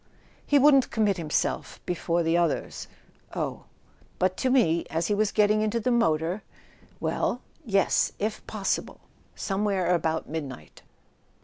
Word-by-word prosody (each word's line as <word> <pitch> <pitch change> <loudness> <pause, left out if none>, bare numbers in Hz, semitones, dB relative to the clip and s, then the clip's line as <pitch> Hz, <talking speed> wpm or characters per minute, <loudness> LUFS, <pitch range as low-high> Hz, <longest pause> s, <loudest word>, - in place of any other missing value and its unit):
"He 290 - +4
wouldn't 275 -1 +5
commit 210 -4 +1
himself, 160 -3 -2
before 170 -1 0
the 165 +1 +1
oth 170 -3 -1 0.5
"Oh - - -3 0.3
" - - -32
"But 185 0 +1
to 260 - 0
me, 170 -11 +3
as 160 +1 -1
he - - +3
was 210 0 +1
getting 215 0 +3
into 215 +2 0
the 250 +3 0
motor 170 -4 +1 0.3
" - - -28
"Well?" 245 - -1 0.2
"Yes: 200 -6 +2
if 215 +1 -3
possible. 205 -3 -2 0.3
Somewhere 195 -3 0
about 160 -2 0
midnight." 140 - -7
195 Hz, 140 wpm, -27 LUFS, 165-215 Hz, 0.5 s, wouldn't